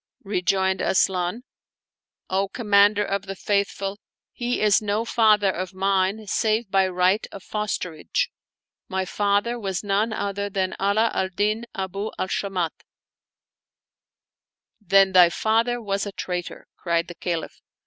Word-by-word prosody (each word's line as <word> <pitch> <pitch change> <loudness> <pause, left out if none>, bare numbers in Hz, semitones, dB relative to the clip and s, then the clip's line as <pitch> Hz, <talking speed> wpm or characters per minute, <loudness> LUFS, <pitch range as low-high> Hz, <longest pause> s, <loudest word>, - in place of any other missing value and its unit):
Rejoined 190 -1 0
Asian, 185 +4 +1 0.4
" - - -69 0.3
O 195 +1 +1
Commander 205 -1 +3
of 200 0 -3
the 195 - -5
Faith 200 +1 +1
ful, 195 +1 -5 0.3
he 245 0 -2
is 210 -1 +4
no 210 +2 -1
father 215 -4 +4
of 185 +1 -5
mine, 195 +2 +1
save 215 0 0
by 195 -1 +3
right 185 +3 +1
of 195 - -10
fosterage; 210 - -2 0.6
my 190 0 -1
father 205 +5 0
was 195 -3 -3
none 205 +3 +1
other 200 -1 -2
than 190 -1 -1
Ala 210 +3 +2
al 190 - 0
Din.Abu 205 0 -2
al - - -1
Shamat/' 185 -4 -2 0.7
" 205 -5 -31
Then 195 -1 +6
thy 180 -2 +7
father 230 +6 +1
was 200 -2 -2
a - - -5
traitor," 180 -2 -5
cried 170 -1 0
the 175 - -8
Caliph. 170 -1 -4
200 Hz, 140 wpm, -24 LUFS, 190-210 Hz, 0.7 s, thy